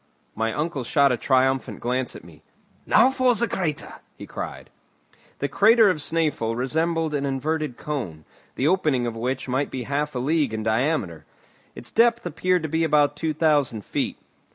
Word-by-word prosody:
My 110 Hz, +1 st, -1 dB
uncle 150 Hz, 0 st, -2 dB
shot 140 Hz, +3 st, +3 dB
a -, -, +2 dB
triumphant 130 Hz, +2 st, +1 dB
glance 125 Hz, +1 st, -2 dB
at -, -, -10 dB
me. -, -, -16 dB, 0.5 s
"Now 260 Hz, -, +5 dB
for 255 Hz, -2 st, +2 dB
the 235 Hz, +2 st, +1 dB
crater!" 170 Hz, -8 st, -3 dB, 0.2 s
he -, -, -9 dB
cried. -, -, -7 dB, 0.7 s
The 140 Hz, -, -1 dB
crater 215 Hz, -, +5 dB
of 180 Hz, -, -3 dB
Snæfell 150 Hz, -7 st, -1 dB
resembled 160 Hz, +4 st, 0 dB
an 145 Hz, -1 st, -1 dB
inverted 145 Hz, 0 st, -2 dB
cone, 95 Hz, -, -5 dB, 0.3 s
the 135 Hz, -, 0 dB
opening 155 Hz, -8 st, +2 dB
of 115 Hz, -1 st, -3 dB
which 125 Hz, +4 st, -3 dB
might 130 Hz, +3 st, -1 dB
be 130 Hz, -, -5 dB
half 145 Hz, +3 st, -2 dB
a -, -, -1 dB
league 140 Hz, -2 st, 0 dB
in 110 Hz, -, -4 dB
diameter. 110 Hz, -, -1 dB, 0.5 s
Its 120 Hz, -, -7 dB
depth 235 Hz, -1 st, +3 dB
appeared 180 Hz, +1 st, 0 dB
to -, -, -1 dB
be 160 Hz, +2 st, 0 dB
about 150 Hz, -2 st, +3 dB
two 160 Hz, +1 st, -2 dB
thousand 145 Hz, -, +1 dB
feet. -, -, -2 dB
145 Hz, 175 wpm, -24 LUFS, 125-165 Hz, 0.7 s, Now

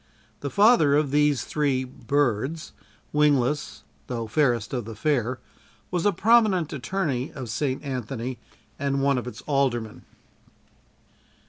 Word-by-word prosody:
The 140 Hz, -, -4 dB
father 200 Hz, -, +5 dB
of 145 Hz, -2 st, +1 dB
these 145 Hz, -2 st, +2 dB
three 140 Hz, -4 st, 0 dB
birds 135 Hz, +2 st, -1 dB, 0.4 s
wingless, 150 Hz, -1 st, +1 dB, 0.2 s
though 115 Hz, -2 st, -3 dB
fairest 120 Hz, -1 st, +1 dB
of 120 Hz, -4 st, -2 dB
the 115 Hz, 0 st, -8 dB
fair, 125 Hz, 0 st, 0 dB, 0.5 s
was 180 Hz, +1 st, +1 dB
a -, -, +4 dB
prominent 200 Hz, -4 st, +3 dB
attorney 140 Hz, -2 st, -2 dB
of 130 Hz, -5 st, -6 dB
St. 130 Hz, +5 st, -2 dB
Anthony 125 Hz, -2 st, -4 dB, 0.4 s
and 140 Hz, 0 st, 0 dB
one 140 Hz, -2 st, +2 dB
of 125 Hz, -, -7 dB
its 125 Hz, -, -8 dB
aldermen. 130 Hz, -6 st, -1 dB
140 Hz, 125 wpm, -25 LUFS, 125-150 Hz, 0.5 s, father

